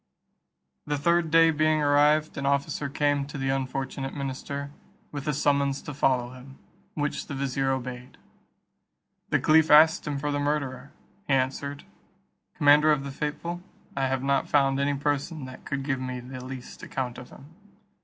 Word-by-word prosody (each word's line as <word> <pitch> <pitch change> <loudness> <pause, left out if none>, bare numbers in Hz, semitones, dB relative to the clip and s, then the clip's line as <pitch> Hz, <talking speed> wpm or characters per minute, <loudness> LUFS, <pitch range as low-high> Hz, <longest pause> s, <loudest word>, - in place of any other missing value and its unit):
The 145 0 0
third 170 +2 +2
day 165 0 +6
being 155 0 +2
arrived, 150 +2 +3
an 140 0 -2
officer 140 0 0
came 145 0 +1
to 145 - -7
the 135 0 -2
unfortunate 135 0 -3
minister, 140 +1 -5 0.4
with 145 0 -6
a 150 - +1
summons 140 -1 +1
to 150 - -6
follow 130 -3 +1
him, 130 +1 -13 0.4
which 145 -1 -2
the 140 - -5
vizier 135 0 -1
obeyed. 125 -1 -4 1.1
The - - +2
caliph 160 0 +4
asked 160 +3 +6
him 145 -1 -2
for 145 +1 -2
the 145 - -1
murderer. 140 -2 -2 0.4
He 135 - +3
answered, 140 +2 -2 0.7
"Commander 150 +1 +5
of 145 -2 +1
the 140 - -5
faithful, 170 +5 -4 0.3
I 135 -1 +1
have 130 0 -1
not 140 0 +1
found 135 -1 +3
any 140 0 +1
person 145 +1 -2
that 130 0 -11
could 140 -1 -3
give 135 -2 -1
me 130 -1 -4
the 125 +1 -8
least 130 -1 -9
account 125 -3 -4
of 125 - -11
him." 145 +4 -15
140 Hz, 165 wpm, -26 LUFS, 135-150 Hz, 1.1 s, day